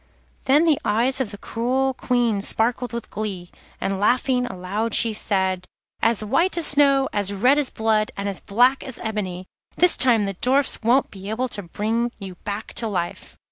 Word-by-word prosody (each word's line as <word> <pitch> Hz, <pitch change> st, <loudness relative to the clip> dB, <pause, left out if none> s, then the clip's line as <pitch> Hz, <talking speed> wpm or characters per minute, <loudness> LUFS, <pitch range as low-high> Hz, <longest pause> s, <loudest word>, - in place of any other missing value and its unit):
Then 285 Hz, +5 st, +4 dB
the 310 Hz, -4 st, +2 dB
eyes 235 Hz, +5 st, +1 dB
of 245 Hz, -, -2 dB
the 205 Hz, -, -9 dB
cruel 260 Hz, +5 st, -1 dB
Queen 240 Hz, -5 st, 0 dB
sparkled 240 Hz, +4 st, 0 dB
with 235 Hz, -1 st, -7 dB
glee, 195 Hz, -5 st, -5 dB, 0.3 s
and 195 Hz, 0 st, -2 dB
laughing 250 Hz, +3 st, +1 dB
aloud 205 Hz, +2 st, -3 dB
she 230 Hz, -2 st, +1 dB
cried: 190 Hz, -3 st, -1 dB, 0.3 s
'As 225 Hz, -1 st, +2 dB
white 330 Hz, -, +1 dB
as 335 Hz, -, +1 dB
snow, 275 Hz, -2 st, +4 dB
as 200 Hz, -1 st, 0 dB
red 250 Hz, +9 st, +3 dB
as 285 Hz, -, 0 dB
blood, 220 Hz, -1 st, 0 dB
and 200 Hz, 0 st, -3 dB
as 195 Hz, -2 st, -3 dB
black 245 Hz, +6 st, +2 dB
as 260 Hz, -, -5 dB
ebony, 190 Hz, -5 st, -4 dB, 0.3 s
this 360 Hz, 0 st, +5 dB
time 235 Hz, -6 st, +5 dB
the 195 Hz, -, -3 dB
Dwarfs 260 Hz, +8 st, +2 dB
won't 245 Hz, +4 st, +2 dB
be 195 Hz, 0 st, -9 dB
able 245 Hz, +4 st, -2 dB
to 205 Hz, -, -2 dB
bring 220 Hz, +6 st, -2 dB
you 195 Hz, -2 st, -8 dB
back 205 Hz, +4 st, -7 dB
to 230 Hz, -, +3 dB
life. 175 Hz, -5 st, -5 dB
225 Hz, 180 wpm, -22 LUFS, 200-255 Hz, 0.3 s, this